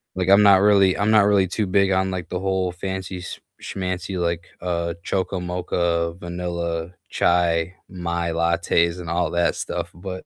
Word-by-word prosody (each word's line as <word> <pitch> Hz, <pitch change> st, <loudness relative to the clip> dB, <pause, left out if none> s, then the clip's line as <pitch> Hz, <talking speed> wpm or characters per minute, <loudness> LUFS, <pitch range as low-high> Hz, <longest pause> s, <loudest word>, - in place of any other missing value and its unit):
Like, 95 Hz, 0 st, -1 dB
I'm 100 Hz, +1 st, +7 dB
not 100 Hz, -2 st, +7 dB
really 100 Hz, -2 st, +4 dB
I'm 105 Hz, -, +1 dB
not 105 Hz, -2 st, +6 dB
really 100 Hz, -2 st, +3 dB
too 105 Hz, +4 st, -1 dB
big 95 Hz, +1 st, +2 dB
on, 95 Hz, 0 st, +1 dB
like, 90 Hz, -2 st, -5 dB
the 90 Hz, -, -3 dB
whole 95 Hz, -1 st, 0 dB
fancy 95 Hz, 0 st, -5 dB
sch -, -, -7 dB, 0.2 s
schmancy, 95 Hz, 0 st, -4 dB
like, 85 Hz, -1 st, -2 dB
uh, 85 Hz, -1 st, -2 dB
choco 95 Hz, 0 st, -2 dB
mocha, 85 Hz, -1 st, -1 dB
vanilla, 85 Hz, -1 st, -4 dB, 0.2 s
chai, 85 Hz, 0 st, +1 dB
my 85 Hz, -2 st, -3 dB
lattes 85 Hz, +1 st, +1 dB
and 85 Hz, -2 st, -7 dB
all 85 Hz, -1 st, 0 dB
that 85 Hz, 0 st, +1 dB
stuff, -, -, -4 dB
but, 95 Hz, +1 st, -7 dB
90 Hz, 170 wpm, -22 LUFS, 85-95 Hz, 0.2 s, I'm